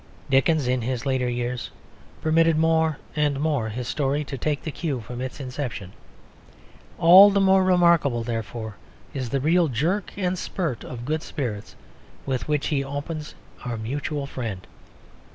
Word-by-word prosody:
Dickens, 135 +1 +3
in 125 0 +1
his 125 +1 -3
later 130 -2 0
years, 120 0 -3 0.5
permitted 165 0 +3
more 160 -1 +2 0.2
and 145 -2 +1
more 145 -7 0
his 120 +3 -5
story 145 +2 0
to 140 - -6
take 145 +2 -2
the 155 - -4
cue 145 -4 -3
from 120 +2 -7
its 130 +2 -5
inception. 125 -8 -5 1.1
All 185 +5 +9
the 200 0 +2
more 190 -1 +5
remarkable, 170 -9 +3
therefore, 110 -2 -5 0.4
is 130 -4 -3
the 140 - 0
real 165 +5 +3
jerk 165 - -1
and 185 -2 -1
spurt 165 - -3
of 120 -1 -7
good 155 +3 -1
spirits 115 -11 -5 0.5
with 130 -4 -2
which 150 -2 0
he 140 -3 0
opens 150 +3 -5 0.3
Our 120 -2 -3
Mutual 140 +5 -3
Friend. 115 -9 -5
140 Hz, 155 wpm, -24 LUFS, 125-160 Hz, 1.1 s, All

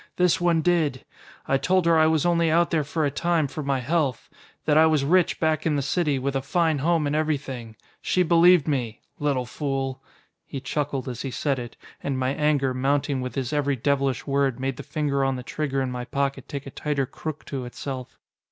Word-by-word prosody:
"This 180 -1 +2
one 170 -2 +2
did. 160 -7 +1 0.4
I 135 - +2
told 185 +2 +2
her 170 -1 +5
I 160 0 +5
was 160 -1 +2
only 170 -1 +3
out 170 +2 +3
there 160 -3 +2
for 155 +2 -1
a 140 - 0
time 170 +2 +1
for 140 +3 -5
my 135 -2 -1
health. 140 -2 -1 0.3
That 150 - +3
I 160 +1 +7
was 155 -3 +2
rich 180 +3 +3
back 155 -1 +1
in 155 -2 +1
the 140 - 0
city, 150 -1 +1
with 135 +1 -2
a 135 - +1
fine 160 +1 +1
home 165 +1 +2
and 145 +1 0
everything. 135 -7 -2 0.3
She 180 - +2
believed 170 -1 +5
me. 120 -7 -2 0.2
Little 140 -4 0
fool!" 135 0 -3 0.4
He 135 - -6
chuckled 135 0 -3
as 125 -2 -5
he 135 - -3
said 135 +1 -1
it, 120 0 -8 0.2
and 135 -2 -2
my 130 0 0
anger, 145 -3 +1
mounting 135 +1 0
with 125 0 -5
his 130 -1 -2
every 145 -1 +1
devilish 135 -1 0
word, 140 -3 +1
made 135 -1 -2
the - - -5
finger 145 -3 -1
on 135 0 +1
the 125 - -6
trigger 135 -1 -2
in 130 - -3
my 125 0 -4
pocket 140 -1 -2
take 140 -1 -6
a 135 - -8
tighter 145 -2 -1
crook 155 +3 -7
to 135 -3 -4
itself. 130 +1 -7
140 Hz, 215 wpm, -25 LUFS, 135-155 Hz, 0.4 s, I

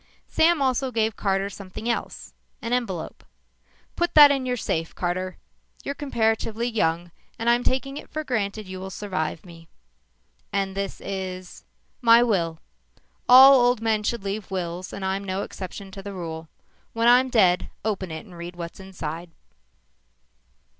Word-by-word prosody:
Sam 325 -2 +3
also 260 0 +1
gave 220 -2 0
Carter 195 -1 0
something 200 +2 -8
else 235 - -3 0.3
an 230 - -3
envelope. 195 -10 -3 0.7
"Put 345 0 -1
that 295 -2 +10
in 270 -2 -1
your 250 0 0
safe, 165 -7 -2
Carter. 185 +1 -2 0.5
You're 280 - -3
comparatively 225 -4 -1
young. 175 -7 0 0.3
I'm 235 +1 +2
taking 275 +2 -1
it - - -9
for 310 - -4
granted 215 -5 -2
you 185 0 -7
will 190 +1 -6
survive 185 -5 -4
me." 165 -2 -14 0.8
"And 195 -1 -1
this 195 -1 -4
is 185 -2 -6 0.2
?" - - -43
"My 235 0 +7
will. 170 -8 0 0.7
All 265 +2 +10
old 245 -1 +3
men 220 -1 +1
should 215 0 -2
leave 200 0 -4
wills 180 -1 -4
and 195 - -5
I'm 190 +1 -1
no 195 +1 -2
exception 195 +1 -8
to 195 - -8
the 200 0 -7
rule. 165 -3 -6 0.4
When 230 +1 +1
I'm 250 +2 +6
dead, 185 -7 +3 0.2
open 195 -4 -2
it 160 +4 -7
and 185 -4 -14
read 170 +1 -8
what's 170 +2 -7
inside." 175 -3 -6
200 Hz, 155 wpm, -24 LUFS, 185-235 Hz, 0.8 s, that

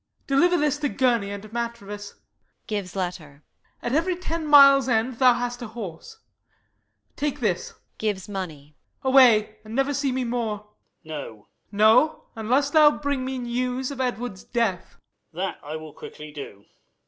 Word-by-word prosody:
Deliver 345 +6 +3
this 295 -2 +1
to 290 -1 0
Gurney 240 -7 +1
and 200 0 -6
Matrevis: 210 -4 -5 0.5
[Gives 200 -4 -4
letter. 160 -6 -5 0.4
At 240 - -2
every 335 +4 +1
ten 330 -3 -4
mile 275 -2 +7
end 230 +1 0
thou 250 -2 +6
hast 245 0 -3
a 240 - -5
horse: 215 - -8 1.0
Take 295 -1 -2
this 470 -1 -2 0.2
[Gives 205 -4 -2
money]: 155 -8 -7 0.3
away, 245 -6 +5
and 220 +1 -8
never 270 +2 +1
see 280 -1 0
me 255 0 -1
more! 220 -3 -3 0.3
Light. 155 -1 -5
No? - - -3
Y. - - -8
Mor. 105 -1 -22 0.3
No; 220 +9 +4
unless 255 +6 +1
thou 305 -1 +7
bring 285 -2 -2
me 260 0 -3
news 250 +2 -2
of 270 -2 -4
Edward's 245 -6 -3
death. 225 -7 -2 0.4
Light. 185 +3 -3
That 155 +2 -6
will 155 -1 -10
I - - -21
quickly 150 0 -9
do. 120 -9 -10
235 Hz, 160 wpm, -24 LUFS, 200-270 Hz, 1.0 s, mile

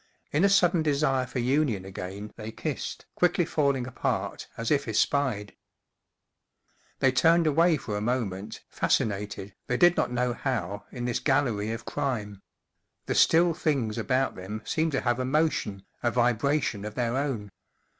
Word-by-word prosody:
In 155 +5 +2
a 200 - +6
sudden 175 -3 +4
desire 140 -4 +1
for - - -6
union 125 -5 +1
again 95 +2 -7
they 110 0 -7
kissed, - - -5
quickly 175 -1 +2
falling 140 -5 +1
apart, 125 - -3
as 115 0 -2
if 145 -3 +2
espied. 110 -2 0 1.4
They 135 - +3
turned 165 +6 +4
away 160 +2 +4
for 105 -5 -5
a - - -3
moment, 105 -4 -3
fas* - - +2
cinated, 100 -2 -4
they 125 - 0
did 175 +3 +6
not - - 0
know 125 0 0
how, 105 -7 -3
in 120 -1 -5
this 120 -1 0
gallery 125 -7 +1
of 115 0 -5
crime; 105 -7 -3 0.6
the - - -1
still 170 +1 +5
things 140 -10 -1
about 135 0 +1
them 105 +4 -7
seemed 160 -1 0
to 135 - +1
have 120 0 0
a - - 0
motion, 130 -8 0 0.2
a 120 - +1
vibra¬ 125 +4 +2
tion 105 -2 -3
of 105 0 -6
their 120 -1 0
own. 130 -8 -2
125 Hz, 165 wpm, -27 LUFS, 105-145 Hz, 1.4 s, a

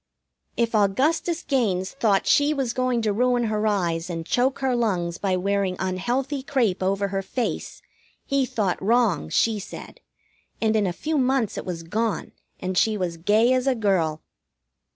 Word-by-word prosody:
If 235 -1 +1
Augustus 280 - +1
Gaines 200 -9 0
thought 215 -7 +1
she 290 +1 +3
was 260 -4 -1
going 255 -2 0
to 210 -2 +1
ruin 245 +2 +2
her 215 -1 0
eyes 175 -4 0
and 165 -2 -4
choke 255 +7 +1
her 265 -2 0
lungs 180 -8 -1
by 190 -2 0
wearing 195 0 0
unhealthy 245 +10 -2
crêpe 245 -9 0
over 195 +1 0
her 195 0 -1
face 235 +5 -4 0.4
he 275 -1 +1
thought 205 -6 -1
wrong, 215 - +2
she 220 - +2
said, 200 - -9 0.6
and 220 -1 +1
in 210 -2 +2
a - - 0
few 305 - -2
months 255 -4 +1
it - - -6
was 170 -2 -4
gone 215 +5 -2 0.3
and 185 0 0
she 220 -1 +2
was 180 -3 -2
as - - -12
gay 215 +8 +3
as 255 +1 0
a 265 - +3
girl. 180 -8 0
215 Hz, 175 wpm, -24 LUFS, 185-250 Hz, 0.6 s, she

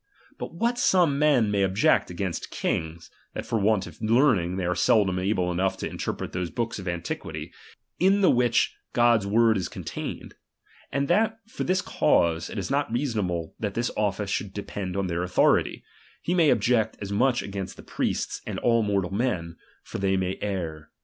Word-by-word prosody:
But - - -6
what 235 +6 0
some 170 - +3
man 135 -8 +3
may 100 -1 +1
object 95 +1 +3
against 90 -1 -4
kings, 80 +1 -3 0.2
that - - -4
for 115 - 0
want 105 -1 +2
of - - -13
learning 110 -6 +3
they 95 - -1
are 90 - +1
seldom 95 0 +3
able 90 -2 0
enough 95 +2 0
to - - -3
interpret - - -4
tliose 90 -1 -3
hooka 115 -2 -2
of 95 - -8
antiquity, 85 0 -4 0.5
in 195 +3 +4
the 190 - +6
which 120 -1 +2 0.2
God's 120 -4 +4
word 115 +2 +4
is 95 - -3
contained; - - -6 0.6
and 140 0 0
that 220 +5 +2
for - - -4
this 185 +1 +1
eause, 85 0 +2
it - - -7
is 95 -2 -3
not 140 -3 0
reasonable 105 - -1
that 105 -3 -3
this 120 +1 0
office 100 -1 -1
should 100 -2 -3
depend 100 -2 -4
on 100 - 0
their 85 -1 -2
authority; 90 +1 +2 0.4
he 175 - 0
may 170 -4 +4
object 115 -5 +2
as 100 -1 -6
much 125 +4 +2
against 100 -1 -6
the - - -11
priests - - -2
and - - -3
all 115 -1 +3
mortal 100 -4 0
men; 90 -8 -1 0.3
for - - -6
they 95 -1 +1
may 95 0 -2
err. 85 -7 -4
100 Hz, 185 wpm, -26 LUFS, 90-120 Hz, 0.6 s, the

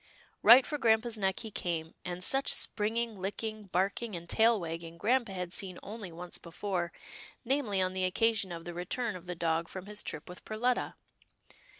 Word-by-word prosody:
Right 250 +3 +9
for 295 - -3
grampa' 225 0 +3
s 225 - -3
neck 190 -2 0
he 220 -2 -7
came, 165 -4 -3
and 180 0 -5
such 270 +7 +2
springing, 220 -1 +3
licking, 215 +2 -4
barking 195 +4 -1
and 170 0 -7
tail 225 +3 +4
wagging, 165 -1 -6
grampa 235 +3 +2
had 180 -2 -4
seen 185 -3 -3
only 210 -3 -7
once 175 +2 -7
before, 175 0 -3 0.5
namely 240 -6 +1
on 185 0 -1
the 185 0 0
occasion 210 0 +2
of 165 -1 -6
the 175 - -5
return 205 +6 -2
of 180 0 -10
the 180 - -3
dog 165 0 0
from 185 +1 -7
his 210 0 -1
trip 150 - -6
with 180 - -10
Perletta. 245 +3 0
195 Hz, 185 wpm, -31 LUFS, 175-225 Hz, 0.5 s, Right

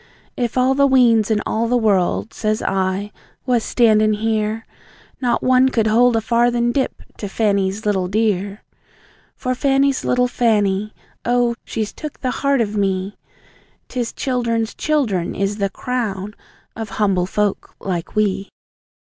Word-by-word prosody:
"If 240 0 -2
all 255 +1 +3
the 280 +1 +4
weans 235 -5 +4
in 210 -2 +1
all 225 +1 0
the 245 +1 +2
world," 210 -1 +1
says 215 0 -1
I, 190 +2 -1 0.3
"was 245 -3 +1
standin' 215 -3 +3
here, 220 +1 -1 0.6
Not 245 -2 0
one 255 +1 +4
could 225 -4 +1
hold 235 +2 +4
a 225 - +2
farthin' 240 +1 +2
dip 265 +2 -2
to 205 - -5
Fanny's 200 -1 0
little 190 -3 +1
dear!" 205 0 -1 0.7
For 255 - -2
Fanny's 275 +1 +1
little 250 0 +2
Fanny 215 -4 +1 0.3
oh, 245 0 +2
she's 215 -2 -4
took 305 -2 -8
the 255 - -1
heart 275 -1 +1
of 215 -2 -2
me! 195 -1 -1 0.7
'Tis 245 -2 -3
childern's 235 -4 -1
childern 230 - 0
is 200 +1 -1
the 200 -2 0
CROWN 210 -4 -3 0.4
of 225 -2 -5
humble 190 -4 +1
folk 210 +1 -2
like 175 -4 -4
we! 200 -2 0
220 Hz, 145 wpm, -20 LUFS, 205-245 Hz, 0.7 s, the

